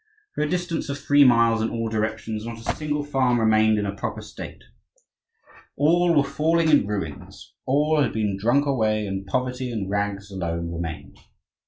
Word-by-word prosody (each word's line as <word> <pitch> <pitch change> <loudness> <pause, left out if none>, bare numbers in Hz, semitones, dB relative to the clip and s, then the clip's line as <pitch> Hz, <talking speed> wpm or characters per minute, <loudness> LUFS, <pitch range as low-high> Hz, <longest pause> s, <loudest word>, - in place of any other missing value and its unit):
For - - -3
a 150 - -1
distance 175 -3 -2
of 140 - -3
three 145 0 +4
miles 115 -3 +4
in 110 - 0
all 115 -1 -3
directions, 110 0 -3
not 115 0 -6
a 115 - -3
single 150 -1 -2
farm 130 -4 +1
remained 110 -1 +4
in 105 - -1
a 100 - -3
proper - - -5
state. - - -10 1.1
All 170 +3 +3
were 145 - +5
falling 160 +4 +1
in 145 -9 +4
ruins; 85 -9 -6
all 150 +3 +2
had 130 - +1
been 105 -3 -1
drunk 120 +9 +2
away, 110 -6 +1
and 95 0 -5
poverty 125 +3 -2
and 100 -4 -4
rags 100 0 -2
alone 85 -3 -3
remained. 85 -2 -6
115 Hz, 175 wpm, -24 LUFS, 100-145 Hz, 1.1 s, were